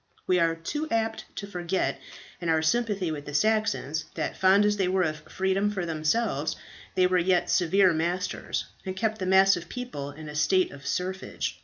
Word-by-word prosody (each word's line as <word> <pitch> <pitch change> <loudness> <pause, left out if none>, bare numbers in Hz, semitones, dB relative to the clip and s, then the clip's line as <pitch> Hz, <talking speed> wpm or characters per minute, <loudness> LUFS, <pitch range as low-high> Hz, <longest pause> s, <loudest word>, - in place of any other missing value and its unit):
We 180 -1 +3
are 165 -1 +2
too 295 - -4
apt 225 -2 -1
to 200 - -5
forget, 180 -1 -2 0.4
in 170 - -2
our 160 -1 +2
sympathy 200 -2 +1
with 145 -2 -5
the 145 - -5
Saxons, 215 -6 +1
that - - -2
fond 195 +2 +5
as 210 0 +2
they 190 -2 +1
were 185 0 +2
of 155 -2 -1
freedom 190 +2 +1
for 190 -4 -3
themselves, 160 -1 0 0.4
they 185 - +4
were 180 0 +3
yet 180 0 +2
severe 185 +1 +4
masters, 175 +4 -2 0.2
and 185 -1 -4
kept 220 +1 -1
the 185 - -2
mass 190 +1 +6
of 170 - -6
the - - -23
people 245 - -5
in 155 +2 -10
a 150 - -7
state 180 +5 +2
of 140 0 -10
serfage. 185 +1 -3
185 Hz, 195 wpm, -27 LUFS, 160-200 Hz, 0.4 s, mass